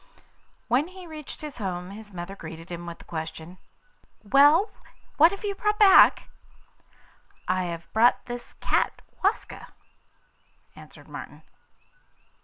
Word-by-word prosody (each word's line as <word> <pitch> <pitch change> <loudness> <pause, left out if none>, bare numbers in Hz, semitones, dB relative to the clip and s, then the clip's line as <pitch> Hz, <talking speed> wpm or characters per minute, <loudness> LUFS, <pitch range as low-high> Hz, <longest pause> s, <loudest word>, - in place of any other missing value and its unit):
When 255 +6 +2
he 370 0 -12
reached 310 -3 -9
his 300 -4 -8
home 180 -2 -4
his 210 +1 -11
mother 180 +1 -7
greeted 165 -1 -10
him 175 0 -6
with 170 - -7
the - - -16
question: 160 +2 -7 0.6
'Well, 290 - +5 0.5
what 320 +3 +7
have 400 +3 -8
you 405 - -1
brought 420 +2 -1
back?' 410 -3 +7 1.2
'I 185 0 +1
have 170 -1 -7
brought 235 +3 +4
this 240 0 -8
cat, - - 0 0.2
Waska,' 395 +4 -1 1.1
answered - - -15
Martin. - - -10
220 Hz, 125 wpm, -26 LUFS, -, 1.2 s, what